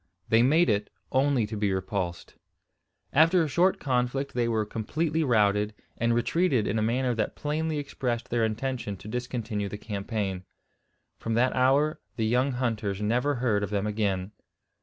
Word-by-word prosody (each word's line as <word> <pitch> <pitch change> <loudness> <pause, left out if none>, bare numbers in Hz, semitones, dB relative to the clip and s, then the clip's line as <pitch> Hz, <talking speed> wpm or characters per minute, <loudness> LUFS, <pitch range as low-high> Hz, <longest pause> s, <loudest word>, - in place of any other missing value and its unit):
They 115 +1 +5
made 155 +8 +4
it, 105 -2 +1 0.2
only 135 -3 +2
to 110 +1 -6
be 105 -1 0
repulsed. 95 -2 -3 0.8
After 165 +4 +5
a - - -1
short 175 +6 +2
conflict 130 +1 -1
they 120 -1 +1
were 110 -2 0
completely 155 +9 -1
routed, 105 -4 +2 0.2
and 115 0 +1
retreated 130 - +2
in 110 - 0
a - - 0
manner 125 +3 +1
that 110 -2 -2
plainly 155 +1 -2
expressed 125 -4 -3
their 120 -1 +2
intention 110 -2 -2
to 100 - -12
discontinue 115 -3 -3
the 105 - -6
campaign. 100 -3 -3 0.8
From 115 0 -2
that 125 +2 +2
hour 140 +4 +3 0.2
the 110 - 0
young 125 +4 +2
hunters 110 -6 -1
never 125 +7 +1
heard 115 -4 +1
of 100 - -2
them 100 -1 -1
again. 105 -3 -1
115 Hz, 160 wpm, -27 LUFS, 105-135 Hz, 0.8 s, They